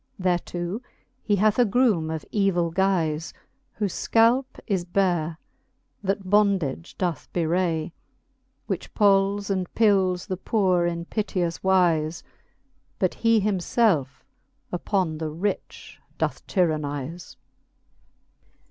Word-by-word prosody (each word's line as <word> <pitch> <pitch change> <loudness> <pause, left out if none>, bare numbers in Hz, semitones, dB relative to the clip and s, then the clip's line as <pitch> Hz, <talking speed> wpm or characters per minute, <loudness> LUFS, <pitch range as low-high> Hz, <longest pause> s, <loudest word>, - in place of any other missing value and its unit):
Thereto 175 +2 -1 0.4
he 205 - +1
hath 210 +3 +2
a - - +7
groome 215 -8 +2
of 160 -1 -4
evill 185 -5 +1
guize, 170 -4 0 0.4
Whole 210 - 0
fcalp 230 +7 +3 0.2
is 190 -5 0
bare, 175 -3 0 0.6
that 195 -1 -2
bondage 190 -7 +1
doth 175 -4 -3
bewray, 170 -1 0 0.7
Which - - -4
pols 200 -1 +3
and 185 -2 -2
pils 190 -5 +3
the 185 - -3
poore 185 -3 +1
in 170 0 -3
piteous 180 -4 -2
wize 170 -4 +2
j - - -34 0.7
But 185 - +1
he 230 -2 +3
him 200 -2 0
lelfe 175 - +1 0.5
uppon 175 -3 -1
the 160 -1 -2
rich 180 +7 -4 0.2
doth - - -2
tyrannize. 155 -2 -2
185 Hz, 110 wpm, -25 LUFS, 170-200 Hz, 0.7 s, a